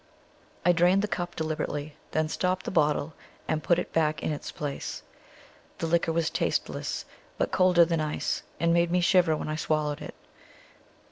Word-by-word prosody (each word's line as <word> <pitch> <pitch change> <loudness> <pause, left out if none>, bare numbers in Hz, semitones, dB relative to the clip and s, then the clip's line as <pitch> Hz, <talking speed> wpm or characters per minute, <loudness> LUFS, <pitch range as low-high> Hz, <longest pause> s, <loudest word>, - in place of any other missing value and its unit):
I 175 - +7
drained 180 +3 +4
the - - +1
cup 175 -3 -3
deliberately, 155 -1 -3
then 155 0 0
stopped 185 +3 -1
the - - -3
bottle 150 -2 +1 0.3
and 155 0 0
put 170 +2 +3
it 180 - -3
back 155 -2 +1
in - - 0
its 145 - -6
place. 145 -2 -5 0.7
The - - -2
liquor 165 0 +2
was 165 0 0
tasteless, - - -2 0.3
but - - 0
colder 180 -2 +5
than 165 -1 0
ice, 155 0 -1 0.2
and 170 +1 +3
made 170 0 +3
me 180 +1 +2
shiver 175 -3 +4
when - - -5
I 155 0 -2
swallowed 150 -1 -1
it. - - -8
165 Hz, 175 wpm, -28 LUFS, 155-175 Hz, 0.7 s, I